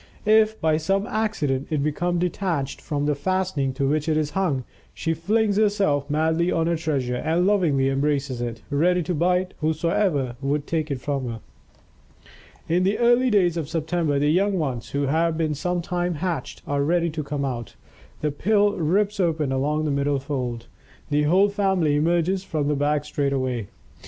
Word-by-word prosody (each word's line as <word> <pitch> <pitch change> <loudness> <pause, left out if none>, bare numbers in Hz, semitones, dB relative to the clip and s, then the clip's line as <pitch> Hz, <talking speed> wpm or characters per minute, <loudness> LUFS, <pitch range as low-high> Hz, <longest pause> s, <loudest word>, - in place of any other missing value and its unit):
If, 220 0 +4
by 155 -1 +2
some 195 +6 0
accident, 165 -13 -1
it 150 -3 0
become 175 +4 0
detached 170 -5 -2
from 145 -2 -2
the 150 - +2
fastening 155 -2 -1
to 135 +1 -1
which 150 +2 0
it 155 - +2
is 150 -1 -1
hung, 155 -7 0 0.3
she 165 - -1
flings 205 +5 +1
herself 200 -10 +1
madly 160 +3 +1
on 165 -1 +1
her 170 0 +1
treasure 140 -6 -1
and 165 +6 +1
lovingly 170 -10 +2
embraces 135 -2 0
it, 115 -2 -5
ready 175 +5 +2
to 180 - -2
bite 180 +3 +1
whoso 155 - 0
would 140 +1 -1
take 160 -1 -2
it 135 -3 -3
from 135 -3 -2
her. 115 -1 -6 1.3
In 175 +2 +2
the 195 +3 +1
early 240 +2 +4
days 180 -6 +3
of 155 -3 -3
September, 160 -2 0
the 145 +1 +2
young 195 +3 +2
ones, 130 -8 -3
who 140 0 -1
have 160 +3 +1
been 160 -2 0
some 175 +4 -2
time 175 0 -1
hatched, 165 -4 -4
are 145 0 -1
ready 170 +2 +1
to 155 0 -3
come 140 0 -3
out. 120 -6 -5 0.5
The 150 - 0
pill 205 +6 +2
rips 200 +6 +1
open 160 -6 +1
along 150 +4 0
the 150 - 0
middle 140 0 +1
fold. 130 -4 -4 0.5
The 150 0 +2
whole 190 +6 +4
family 190 -7 +1
emerges 175 +4 +1
from 150 -6 -2
the 150 - +1
bag 145 +1 0
straightway. 130 -6 -1
155 Hz, 175 wpm, -24 LUFS, 140-180 Hz, 1.3 s, If